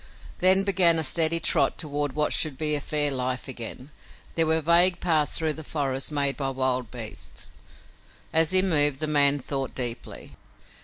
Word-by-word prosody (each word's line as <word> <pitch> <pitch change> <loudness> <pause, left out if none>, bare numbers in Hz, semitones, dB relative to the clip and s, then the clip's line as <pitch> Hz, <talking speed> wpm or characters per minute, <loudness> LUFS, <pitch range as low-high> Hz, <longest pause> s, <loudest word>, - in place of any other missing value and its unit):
Then 190 +2 +5
began 185 -4 +2
a 160 - -1
steady 165 +2 +3
trot - - +1
toward 145 -2 -4
what 150 0 0
should 150 -5 -1
be 150 0 +1
fair 145 0 0
life 130 -1 -3
again. 130 +2 -9 0.4
There 165 -1 +1
were 160 0 +1
vague 170 +3 +3
paths 155 -5 0
through 160 -2 -1
the 160 - -10
forest 135 -2 -3
made 140 -2 0
by 135 -2 -3
wild 130 -2 -2
beasts. 110 - -7 0.8
As 160 0 +3
he 185 0 +5
moved 145 -6 +2
the 155 - -2
man 145 -2 +3
thought 135 -1 -5
deeply. 120 -2 -5
145 Hz, 165 wpm, -24 LUFS, 135-160 Hz, 0.8 s, Then